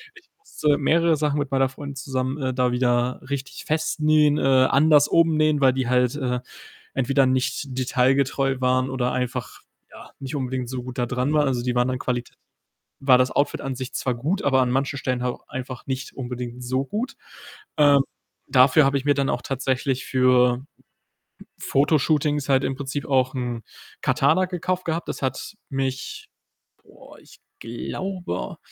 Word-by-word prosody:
Ich 445 Hz, -, -18 dB
musste 150 Hz, -, 0 dB
mehrere 165 Hz, +2 st, +3 dB
Sachen 150 Hz, -1 st, 0 dB
mit 145 Hz, -1 st, -2 dB
meiner 135 Hz, -1 st, +2 dB
Freundin 140 Hz, +1 st, -8 dB
zusammen, 135 Hz, 0 st, -3 dB
äh, 130 Hz, -, 0 dB
da 125 Hz, -1 st, +1 dB
wieder 125 Hz, 0 st, +1 dB
richtig 140 Hz, -1 st, -5 dB
festnähen, 155 Hz, -1 st, +2 dB
äh, -, -, -2 dB
anders 140 Hz, +3 st, +4 dB
umnähen, 155 Hz, -3 st, +3 dB
weil 130 Hz, -2 st, +5 dB
die 130 Hz, -2 st, -1 dB
halt, 125 Hz, +1 st, +2 dB
äh, 125 Hz, -3 st, -1 dB, 0.6 s
entweder 135 Hz, +1 st, +2 dB
nicht 130 Hz, +1 st, -1 dB
detailgetreu 135 Hz, +1 st, +1 dB
waren 130 Hz, 0 st, +1 dB
oder 125 Hz, -1 st, -1 dB
einfach, 125 Hz, -2 st, -3 dB, 0.3 s
ja, -, -, -13 dB
nicht 135 Hz, +2 st, -6 dB
unbedingt 130 Hz, -2 st, -3 dB
so 125 Hz, -1 st, -5 dB
gut 130 Hz, +1 st, -8 dB
da 120 Hz, -, +1 dB
dran 125 Hz, +4 st, -1 dB
waren. 150 Hz, -2 st, +3 dB
Also, 125 Hz, -3 st, -1 dB
die 125 Hz, -1 st, -1 dB
waren 125 Hz, +1 st, +2 dB
an 130 Hz, -, -1 dB
Qualit 125 Hz, -1 st, -2 dB, 0.7 s
war 130 Hz, -2 st, +6 dB
das 130 Hz, 0 st, +2 dB
Outfit 145 Hz, -, 0 dB
an 135 Hz, -, -3 dB
sich 130 Hz, 0 st, -6 dB
zwar 125 Hz, -, -1 dB
gut, 155 Hz, +12 st, -2 dB
aber 135 Hz, -2 st, +3 dB
an 125 Hz, -, +1 dB
manchen 140 Hz, +2 st, -1 dB
Stellen 125 Hz, -2 st, -2 dB
halt 125 Hz, -, -2 dB
einfach 130 Hz, -1 st, -7 dB
nicht 130 Hz, 0 st, -4 dB
unbedingt 125 Hz, -1 st, -6 dB
so 130 Hz, +2 st, -1 dB
gut. 225 Hz, -, -3 dB, 0.6 s
Ähm, 145 Hz, -2 st, +6 dB, 0.5 s
dafür 130 Hz, +3 st, +5 dB
habe 140 Hz, +1 st, +2 dB
ich 135 Hz, -, -5 dB
mir 145 Hz, -, +4 dB
dann 140 Hz, 0 st, 0 dB
auch -, -, -1 dB
tatsächlich 135 Hz, 0 st, -1 dB
für 125 Hz, 0 st, +3 dB, 0.9 s
Fotoshootings 145 Hz, 0 st, +1 dB
halt 135 Hz, 0 st, +3 dB
im 135 Hz, -, -2 dB
Prinzip 140 Hz, 0 st, -4 dB
auch 130 Hz, -1 st, +1 dB
'n 120 Hz, -2 st, -3 dB, 0.4 s
Katana 185 Hz, 0 st, +2 dB
gekauft 180 Hz, 0 st, -3 dB
gehabt. 165 Hz, +1 st, -2 dB
Das -, -, -4 dB
hat 130 Hz, +10 st, -3 dB
mich, 135 Hz, -2 st, -4 dB, 0.6 s
boah, -, -, -17 dB
ich -, -, -19 dB, 0.2 s
glaube 175 Hz, -, -5 dB
135 Hz, 165 wpm, -23 LUFS, 125-145 Hz, 0.9 s, war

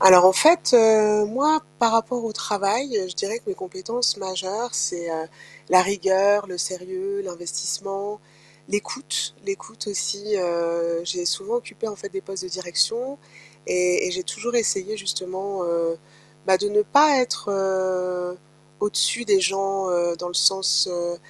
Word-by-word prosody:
Alors 185 Hz, -1 st, +9 dB
en 190 Hz, -, +8 dB
fait, 320 Hz, -, +5 dB
heu, 215 Hz, -2 st, +6 dB
moi 290 Hz, +8 st, +2 dB, 0.2 s
par 230 Hz, -1 st, +3 dB
rapport 235 Hz, +2 st, +1 dB
au 225 Hz, -1 st, -3 dB
travail, 210 Hz, +7 st, -1 dB
heu, 185 Hz, -2 st, -3 dB
je 180 Hz, -, -7 dB
dirais 200 Hz, +8 st, -2 dB
que -, -, -24 dB
mes 395 Hz, -, -2 dB
compétences 370 Hz, -, -2 dB
majeures, 190 Hz, +5 st, -4 dB
c'est, 170 Hz, -1 st, -2 dB
heu, 160 Hz, 0 st, -4 dB, 0.4 s
la 185 Hz, 0 st, +8 dB
rigueur, 200 Hz, +2 st, +2 dB
le 180 Hz, -2 st, -8 dB
sérieux, 185 Hz, +4 st, -4 dB
l'investissement, 185 Hz, +4 st, -5 dB, 0.5 s
l'écoute, 205 Hz, +6 st, -3 dB
l'écoute 375 Hz, -, -6 dB
aussi, 205 Hz, +2 st, -2 dB
heu, 170 Hz, -1 st, -1 dB
j'ai 175 Hz, +1 st, -3 dB
souvent 400 Hz, -, -1 dB
occupé 355 Hz, -, -6 dB
en 210 Hz, -, -7 dB
fait 200 Hz, -, -9 dB
des 195 Hz, -, -5 dB
postes 195 Hz, -1 st, -7 dB
de 185 Hz, -, -7 dB
direction 225 Hz, +9 st, -1 dB, 0.5 s
et 180 Hz, 0 st, +2 dB
et -, -, -2 dB
j'ai 185 Hz, +1 st, -3 dB
toujours 230 Hz, +6 st, -5 dB
essayé 215 Hz, -2 st, 0 dB
justement, 190 Hz, +1 st, -4 dB
heu, 170 Hz, -1 st, -1 dB, 0.5 s
bah, 190 Hz, -1 st, +4 dB
de 205 Hz, -, -1 dB
ne 210 Hz, +1 st, +3 dB
pas 290 Hz, +5 st, +5 dB
être, 250 Hz, -4 st, -1 dB
heu, 185 Hz, -2 st, -1 dB, 0.4 s
au-dessus 210 Hz, +3 st, +1 dB
des 200 Hz, -4 st, +4 dB
gens, 195 Hz, 0 st, 0 dB
heu, 175 Hz, -1 st, +1 dB
dans 175 Hz, -, -5 dB
le 175 Hz, -, -9 dB
sens, 155 Hz, -1 st, +4 dB
heu, 175 Hz, 0 st, -3 dB
195 Hz, 160 wpm, -23 LUFS, 180-220 Hz, 0.5 s, Alors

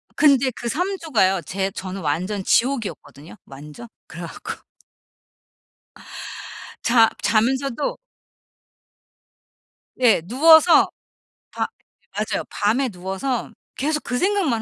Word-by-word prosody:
근데 275 Hz, -3 st, +4 dB
그 240 Hz, -, -5 dB
3 360 Hz, +9 st, -1 dB
주가요 195 Hz, -, +1 dB
제 195 Hz, +3 st, -2 dB
저는 190 Hz, +1 st, -6 dB
완전 185 Hz, +6 st, -2 dB
지옥이었거든요 200 Hz, -, -1 dB
완전. 150 Hz, +11 st, -11 dB, 0.2 s
그래 170 Hz, -, -9 dB
갖고 165 Hz, -, -8 dB, 2.2 s
자 230 Hz, -1 st, +5 dB
자면서도 255 Hz, +5 st, 0 dB, 2.0 s
예 235 Hz, -8 st, +4 dB
누워서 315 Hz, -, +6 dB, 0.6 s
밤 -, -, -2 dB, 0.5 s
맞아요. -, -, -2 dB
밤에 245 Hz, +6 st, +1 dB
누워서 195 Hz, +6 st, -3 dB, 0.2 s
계속 300 Hz, +2 st, -1 dB
그 245 Hz, -, -2 dB
생각만 365 Hz, -, +1 dB
235 Hz, 195 characters per minute, -22 LUFS, 190-275 Hz, 2.2 s, 누워서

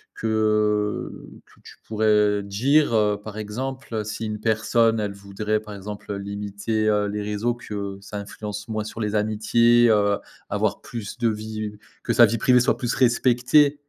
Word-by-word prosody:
que 105 Hz, -1 st, +1 dB, 0.4 s
que -, -, -24 dB
tu -, -, -13 dB
pourrais 105 Hz, -2 st, +2 dB
dire, 125 Hz, +8 st, +2 dB
heu, 105 Hz, -1 st, +3 dB
par 110 Hz, -1 st, -8 dB
exemple, 130 Hz, +4 st, -5 dB
heu, 105 Hz, -, -1 dB
si 110 Hz, +1 st, -5 dB
une 105 Hz, -1 st, -4 dB
personne, 115 Hz, 0 st, +2 dB
elle 100 Hz, -1 st, -2 dB
voudrait, 100 Hz, +2 st, -3 dB
par 105 Hz, -1 st, -10 dB
exemple, 100 Hz, +1 st, -7 dB
heu, 100 Hz, -, -3 dB
limiter, 100 Hz, +2 st, -2 dB
heu, 105 Hz, -1 st, +2 dB
les 105 Hz, +1 st, -3 dB
réseaux, 105 Hz, +3 st, -1 dB
que 100 Hz, -4 st, -6 dB
ça 105 Hz, +1 st, -7 dB
influence 105 Hz, +1 st, -6 dB
moins 110 Hz, -1 st, -2 dB
sur 110 Hz, +2 st, -8 dB
les 105 Hz, 0 st, -1 dB
amitiés, 115 Hz, +3 st, +3 dB
heu, 100 Hz, -2 st, +3 dB, 0.3 s
avoir -, -, -1 dB
plus 115 Hz, -1 st, -7 dB
de 120 Hz, -2 st, +2 dB
vie 110 Hz, 0 st, -4 dB, 0.3 s
que -, -, -1 dB
sa 120 Hz, -, +8 dB
vie 115 Hz, +1 st, 0 dB
privée 125 Hz, +2 st, +4 dB
soit 120 Hz, -, +2 dB
plus 120 Hz, -1 st, -1 dB
respectée? 130 Hz, +4 st, +3 dB
110 Hz, 175 wpm, -23 LUFS, 105-115 Hz, 0.4 s, sa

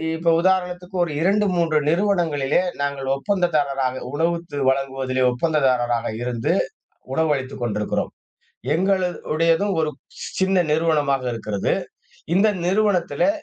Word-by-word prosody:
இப்ப 165 Hz, +1 st, +2 dB
உதாரணத்துக்கு 180 Hz, 0 st, 0 dB
ஒரு 170 Hz, -, -3 dB
2, 200 Hz, +4 st, +3 dB
3 165 Hz, -2 st, +2 dB
நிறுவனங்களிலே 165 Hz, -6 st, +2 dB, 0.2 s
நாங்க 140 Hz, -1 st, -1 dB, 0.2 s
ஒப்பந்ததாரராக 140 Hz, -7 st, 0 dB
உணவுத்து 165 Hz, -1 st, -1 dB
வழங்குவதிலே 135 Hz, -1 st, -1 dB
ஒப்பந்ததாரராக 125 Hz, -4 st, +1 dB
இருந்து 120 Hz, -2 st, -1 dB, 0.6 s
உணவளித்துக் 140 Hz, -5 st, -1 dB
கொண்டிருக்கிறோம். 105 Hz, -3 st, -1 dB, 0.6 s
எங்கள 190 Hz, +2 st, +2 dB, 0.3 s
உடையதும் 165 Hz, +5 st, +2 dB
ஒரு 155 Hz, -, 0 dB, 0.5 s
சின்ன 190 Hz, 0 st, +3 dB
நிறுவனமாக 150 Hz, -4 st, +1 dB
இருக்கிறது. 105 Hz, -3 st, -2 dB, 0.6 s
இந்த 200 Hz, +4 st, +5 dB, 0.2 s
நிறுவனத்துலே 200 Hz, +5 st, +2 dB
160 Hz, 100 wpm, -22 LUFS, 135-180 Hz, 0.6 s, இந்த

